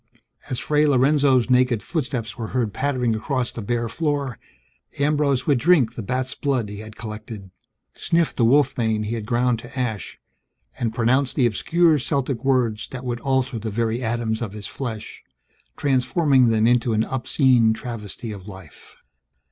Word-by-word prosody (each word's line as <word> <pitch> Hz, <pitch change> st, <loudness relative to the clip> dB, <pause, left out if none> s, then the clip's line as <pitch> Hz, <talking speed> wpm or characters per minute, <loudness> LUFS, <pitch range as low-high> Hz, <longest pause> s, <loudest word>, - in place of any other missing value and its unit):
As 130 Hz, -, -2 dB
Fray 150 Hz, +3 st, +2 dB
Lorenzo's 135 Hz, -2 st, +3 dB
naked 125 Hz, -3 st, +2 dB
footsteps 130 Hz, -8 st, -3 dB
were 115 Hz, -2 st, -5 dB
heard 115 Hz, -5 st, 0 dB
pattering 130 Hz, -4 st, 0 dB
across 125 Hz, +3 st, -2 dB
the 115 Hz, -, -7 dB
bare 120 Hz, +2 st, -1 dB
floor, 145 Hz, -1 st, -2 dB, 0.6 s
Ambrose 140 Hz, -2 st, +1 dB
would 140 Hz, -5 st, +2 dB
drink 145 Hz, -7 st, +4 dB
the 120 Hz, -, -6 dB
bat's 130 Hz, +5 st, -2 dB
blood 130 Hz, -7 st, -1 dB
he 105 Hz, 0 st, -7 dB
had 110 Hz, 0 st, -10 dB
collected, 105 Hz, -3 st, -8 dB, 0.4 s
sniff 165 Hz, -1 st, 0 dB
the 120 Hz, -, 0 dB
wolfbane 115 Hz, -4 st, +2 dB
he 110 Hz, -, -3 dB
had 110 Hz, -3 st, -4 dB
ground 120 Hz, -1 st, +1 dB
to 130 Hz, +3 st, -8 dB
ash, 110 Hz, -7 st, -3 dB, 0.6 s
and 115 Hz, -2 st, -2 dB
pronounce 125 Hz, +3 st, +2 dB
the 130 Hz, -, +3 dB
obscure 160 Hz, +7 st, +2 dB
Celtic 135 Hz, -2 st, -2 dB
words 125 Hz, -5 st, +1 dB
that 130 Hz, 0 st, -7 dB
would 120 Hz, -1 st, -2 dB
alter 130 Hz, -2 st, 0 dB
the 110 Hz, +1 st, -4 dB
very 115 Hz, +2 st, -1 dB
atoms 110 Hz, -1 st, -1 dB
of 105 Hz, -4 st, -4 dB
his 105 Hz, -1 st, -7 dB
flesh, 115 Hz, -6 st, -6 dB, 0.5 s
transforming 135 Hz, 0 st, +3 dB
them 110 Hz, -1 st, +2 dB
into 120 Hz, 0 st, +3 dB
an 110 Hz, 0 st, +2 dB
obscene 130 Hz, -2 st, +2 dB
travesty 110 Hz, -1 st, -6 dB
of 100 Hz, -2 st, -9 dB
life. 95 Hz, -7 st, -13 dB
125 Hz, 160 wpm, -23 LUFS, 110-135 Hz, 0.6 s, drink